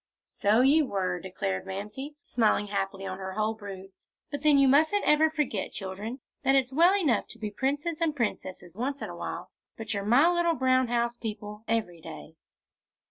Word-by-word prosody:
"So 215 +4 +2
you 285 +3 +4
were," 185 -4 -1
declared 190 +1 -3
Mamsie, 210 +10 -6
smiling 220 -3 +2
happily 195 -1 -3
on 190 0 -5
her 190 0 -5
whole 215 +2 0
brood; 195 -3 -9 0.4
"but 285 -2 -4
then, 300 -1 +5
you 275 -1 +5
mustn't 315 +9 +4
ever 310 +1 +5
forget, 295 -10 -2
children, 205 +6 -6 0.2
that 270 0 +3
it's 265 -1 +2
well 345 +6 +5
enough 285 - +1
to - - -12
be 215 -2 -4
princes 290 +8 -2
and 315 -3 +1
princesses 185 - -4
once 270 +6 -3
in - - -5
a - - -8
while, - - -6 0.3
but 225 -1 -4
you're 200 -1 -2
my 245 +10 +5
little 345 -1 +2
brown 260 -1 +3
house 235 0 0
people 210 -2 -6
every 210 -7 -1
day." 160 0 -10
230 Hz, 185 wpm, -28 LUFS, 195-280 Hz, 0.4 s, then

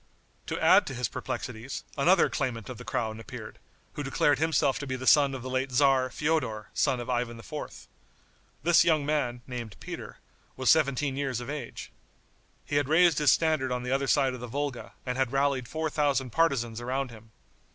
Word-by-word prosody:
To - - -3
add - - +5
to 135 - -5
his 125 -1 -1
perplexities, 120 +3 -5
another 170 +6 +4
claimant 125 -6 -3
of 125 - -7
the - - -8
crown 110 -1 -3
appeared, 115 -2 -9 0.3
who - - -5
declared 140 0 +2
himself 150 -4 +2
to 145 - -5
be 130 - -2
the 130 0 -6
son 140 -1 +5
of 130 - -7
the 130 - -5
late 130 +1 0
tzar, 130 0 +3
Feodor, 125 -7 -1
son 135 -4 +1
of 120 - -6
Ivan 120 -2 -1
IV. 115 -5 -8 0.8
This 170 +1 +6
young 155 -3 +2
man, 125 -5 -1
named 120 -5 -6
Peter, - - -8 0.4
was 130 -1 +4
seventeen 140 -3 +2
years 135 -4 -1
of 125 +3 -6
age. 145 -6 -7 0.7
He 145 - -1
had 145 -1 0
raised 165 -1 +5
his 145 -4 +5
standard 155 -5 +1
on 125 0 -2
the 125 - -3
other 135 0 +1
side 135 -3 +3
of 125 - -7
the 125 - -6
Volga, 140 0 -4
and 125 0 -3
had 130 -2 +1
rallied 135 -2 +1
four 160 +4 -2
thousand 140 -4 0
partisans 120 -8 +1
around 130 +1 -2
him. 110 -1 -14
130 Hz, 195 wpm, -28 LUFS, 125-145 Hz, 0.8 s, This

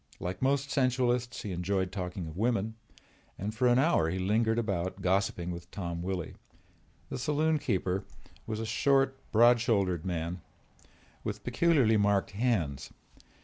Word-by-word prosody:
Like 90 +1 -4
most 140 +1 +1
sensualists 125 -2 +1
he 105 - -4
enjoyed 95 +1 -1
talking 90 -2 -4
of 80 0 -8
women, 110 +1 0 0.6
and 105 +3 -3
for 125 +3 +2
an 120 0 +4
hour 135 - +3
he 90 - -2
lingered 110 +4 +1
about 95 -5 -2
gossiping 90 -2 0
with 85 -1 -8
Tom 85 -3 -4
Willy. 90 -2 -3 0.8
The - - -4
saloon 155 +3 +1
keeper 95 -5 -1 0.4
was 110 -1 -3
a 115 - -3
short, 135 +4 +2 0.2
broad 120 +1 +6
shouldered 95 -8 +1
man 85 -1 -3 0.8
with - - -4
peculiarly 140 -10 +3
marked 100 -1 +2
hands. 100 - -1
105 Hz, 145 wpm, -30 LUFS, 90-125 Hz, 0.8 s, broad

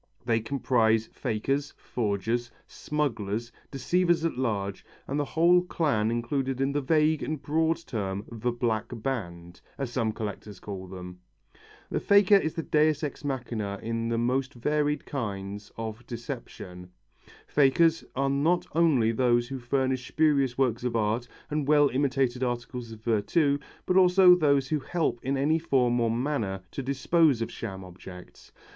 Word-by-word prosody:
They 115 -2 +2
comprise 115 -3 +1
fakers, 135 +6 -2
forgers, 115 +2 -2 0.2
smugglers, 120 -6 -3 0.2
deceivers 170 +5 +1
at 165 - -1
large, 100 -6 -2 0.2
and 140 +2 -2
the 145 - 0
whole 170 +4 +4
clan 145 -11 0
included 130 +3 -1
in 135 +1 +1
the 145 +1 0
vague 155 +2 +2
and 155 -1 -3
broad 160 +3 +1
term 100 -2 -3
"the 115 +1 -2
black 115 -3 -1 0.2
band," 85 -9 -4 0.2
as 135 -4 -3
some 115 -3 0
collectors 105 -2 -6
call 95 -2 -7
them. 90 -1 -9 0.7
The - - 0
faker 200 0 +5
is 160 -5 +1
the 165 - -2
Deus 155 0 +2
ex 150 +1 -4
machina 120 -7 -3
in 115 0 -2
the 115 - 0
most 130 +3 0
varied 150 +4 0
kinds 100 -5 -5
of 110 +1 -5
deception. 115 -7 -7 0.6
Fakers 155 +4 +3
are 135 +1 +1
not 160 +6 +2
only 150 -9 +3
those 120 0 +2
who 135 -1 -4
furnish 130 +1 -1
spurious 140 -5 +2
works 125 -3 +1
of 125 -2 -1
art 115 +2 0 0.2
and 150 -2 -1
well 145 -1 +5
imitated 130 -1 0
articles 120 -1 -4
of 110 -1 -10
virtu, 140 +7 +2 0.3
but 185 - +2
also 180 0 +7
those 140 -6 +2
who 155 - +1
help 150 -2 -1
in 135 +2 -1
any 155 +4 +2
form 125 -6 +2
or 115 -1 +2
manner 115 -6 -2
to - - -4
dispose 140 0 +2
of - - -6
sham 95 -4 -6
objects. 90 0 -12
125 Hz, 150 wpm, -27 LUFS, 110-145 Hz, 0.7 s, also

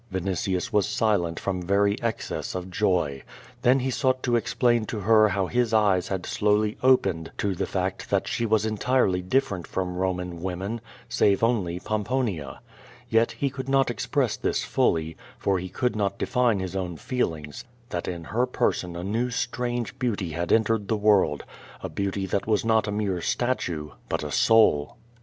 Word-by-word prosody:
Vinitius 95 0 -2
was 105 -2 +3
silent 90 -7 0
from 95 -2 -2
very 100 +3 +2
excess 115 -4 -3
of 90 0 -5
joy. 85 -9 0 0.4
Then 130 +2 +4
he 130 +1 -1
sought 130 +1 0
to 120 -1 +2
explain 120 0 +2
to 110 -1 -4
her 110 +1 +5
how 100 0 0
his 120 +2 +1
eyes 100 -4 +3
had 95 -2 -3
slowly 105 0 +1
opened 95 -11 +2
to 100 -1 0
the - - -2
fact - - -3
that - - +1
she - - -1
was 110 0 +2
entirely 110 -3 +1
different 95 -3 0
from 90 -1 -3
Roman 90 -2 -2
women, 95 +5 -3 0.3
save 100 +1 +2
only 95 -7 +1
Pomponia. 110 - -2 0.5
Yet 115 +1 +3
he 140 -1 -1
could 135 0 -6
not 135 -1 +3
express - - -1
this - - -1
fully, 80 0 0 0.2
for 95 -2 +1
he 90 +1 -6
could 125 +6 -1
not 100 -2 -1
define 125 -4 +2
his 95 -1 -4
own 90 -3 -3
feelings, 80 - -3 0.3
that 85 - -4
in 85 -2 -4
her 120 +10 0
person 90 -7 -1
a 85 - -5
new 115 +6 -1
strange 120 +1 -3
beauty 105 -9 -1
had 85 +2 -3
entered 110 -2 +2
the 110 - +1
world, 100 -8 +3 0.4
a - - -3
beauty 100 -1 -2
that 100 +2 -2
was 110 0 +1
not 110 -1 +3
a - - -1
mere 100 -4 -1
statue, 85 -11 -1 0.2
but - - -1
a 75 - -5
soul. 75 - +4
100 Hz, 175 wpm, -26 LUFS, 90-115 Hz, 0.5 s, her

